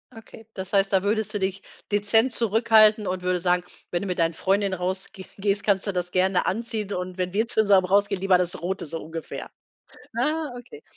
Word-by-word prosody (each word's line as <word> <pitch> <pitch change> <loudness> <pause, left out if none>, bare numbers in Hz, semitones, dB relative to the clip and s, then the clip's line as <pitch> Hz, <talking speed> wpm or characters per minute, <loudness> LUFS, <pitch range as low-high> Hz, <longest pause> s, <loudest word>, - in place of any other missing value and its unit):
Okay, 225 0 -13
das 190 0 -6
heißt, 195 0 +2
da 190 0 +3
würdest 215 +1 0
du 205 - -1
dich 190 +1 -2 0.3
dezent 225 +5 +2
zurückhalten 220 -2 +4
und 185 0 -3
würdest 180 -1 0
sagen: 180 0 +2 0.3
„Wenn 175 +2 -1
du - - -4
mit 180 -1 -3
deinen 165 0 +2
Freundinnen 195 +2 0
rausgeh 190 +2 -4
gehst, 200 0 -1
kannst 200 -1 +2
du 200 - -1
das 180 -1 -3
gerne 185 0 +2
anziehen 215 -1 -2
und 180 0 -5
wenn 180 0 -2
wir 220 +3 +1
zusammen 200 -5 +4
rausgehen 200 0 +2
lieber 190 -2 +4
das 180 -2 -1
Rote“, 185 +1 -3
so 165 +2 -5
ungefähr. 165 0 -7 0.7
Ah, 305 +4 0
okay. 440 - -13
195 Hz, 195 wpm, -24 LUFS, 185-215 Hz, 0.7 s, zurückhalten